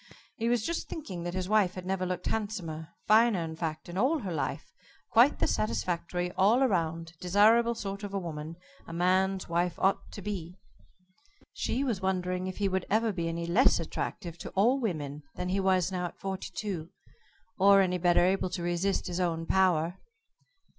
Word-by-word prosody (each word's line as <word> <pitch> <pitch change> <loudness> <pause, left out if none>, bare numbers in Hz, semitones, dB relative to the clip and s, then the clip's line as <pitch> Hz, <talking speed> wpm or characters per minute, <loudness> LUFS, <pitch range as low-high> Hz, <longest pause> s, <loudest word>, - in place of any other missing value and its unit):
He 230 -2 -1
was 240 -3 +1
just 335 0 -3
thinking 195 - -6
that 175 +1 -3
his 185 -1 -2
wife 205 -3 +3
had 185 -1 -7
never 185 -1 -1
looked 180 -1 -4
handsomer, 185 -8 -3 0.2
finer, 215 -4 +4
in 160 0 -5
fact, 160 -1 -4
in 175 +2 -4
all 275 +9 +3
her 195 - -4
life 155 - -3 0.4
quite - - +5
the - - +1
satisfactory, 170 +11 -1
all 220 +9 +4
round, 165 -4 -1
desirable 220 +6 +4
sort 200 -2 -5
of 205 -1 -5
a 200 - -2
woman 160 -3 -5 0.3
a 165 - -8
man's 185 +2 +1
wife 170 0 0
ought 195 +1 +1
to 200 - -8
be. 180 -3 -5 1.0
She 260 +4 -1
was 230 -8 -1
wondering 185 -1 -1
if 185 - -5
he 200 - +1
would 190 -1 -1
ever 220 +2 +2
be 170 -2 -2
any 170 0 -3
less 190 +8 +4
attractive 170 +1 -5
to - - -6
all 235 +8 +4
women 150 - -3
than 180 - -3
he 190 +2 +1
was 190 -1 +2
now 180 -1 -2
at - - -12
forty 190 -1 -4
two 180 -6 -4 0.7
or 200 +1 +7
any 180 -1 +1
better 175 0 +4
able 190 0 +1
to 175 -1 -4
resist 175 +3 0
his 175 0 -3
own 165 -2 -1
power. 180 -1 +2
185 Hz, 185 wpm, -29 LUFS, 170-200 Hz, 1.0 s, or